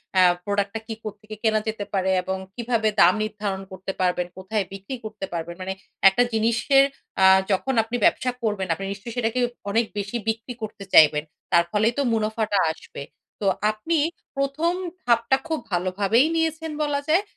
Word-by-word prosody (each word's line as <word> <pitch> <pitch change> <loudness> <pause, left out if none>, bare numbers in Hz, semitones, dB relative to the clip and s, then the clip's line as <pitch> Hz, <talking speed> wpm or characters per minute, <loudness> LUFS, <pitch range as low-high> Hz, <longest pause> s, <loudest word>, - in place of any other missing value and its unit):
এ্যা 185 - +6 0.2
product 200 -1 0
টা - - -1
কি, 225 - -4
কোত্থেকে 215 0 -8
কেনা 220 -1 +3
যেতে 215 -2 -3
পারে 190 -1 +1
এবং 190 +1 -2 0.2
কিভাবে 235 -2 0
দাম 175 +1 +7
নির্ধারণ 205 -2 -3
করতে 190 +1 -5
পারবেন, 180 -1 +1
কোথায় 195 +2 -2
বিক্রি 195 +7 -6
করতে 210 -2 -5
পারবেন। 170 0 -4
মানে 190 +1 -3 0.4
একটা 220 +6 +2
জিনিসের 235 +5 +4 0.4
আ - - +8 0.3
যখন 230 +8 +1
আপনি 225 +2 -5
ব্যবসা 255 - +2
করবেন 205 -4 -1
আপনি 195 +4 -6
নিশ্চয়ই 215 +4 -9
সেটাকে 235 +1 0 0.3
অনেক 225 +3 +2
বেশি 200 +3 -2
বিক্রি 225 +2 -3
করতে 210 -2 -6
চাইবেন। 150 -1 +7 0.3
তার 170 - +5
ফলেই 215 +3 +2
তো - - +3
মুনাফাটা 215 -2 0
আসবে। 160 - -9 0.4
তো 200 - +1 0.2
আপনি 320 +11 -1 0.4
১ম 275 +5 0 0.3
ধাপটা 235 +2 +3
খুব 320 -2 -1
ভালোভাবেই 195 +7 +2
নিয়েছেন 320 0 -1
বলা 290 -1 0
যায়। 335 +6 +3
215 Hz, 165 wpm, -24 LUFS, 195-240 Hz, 0.4 s, আ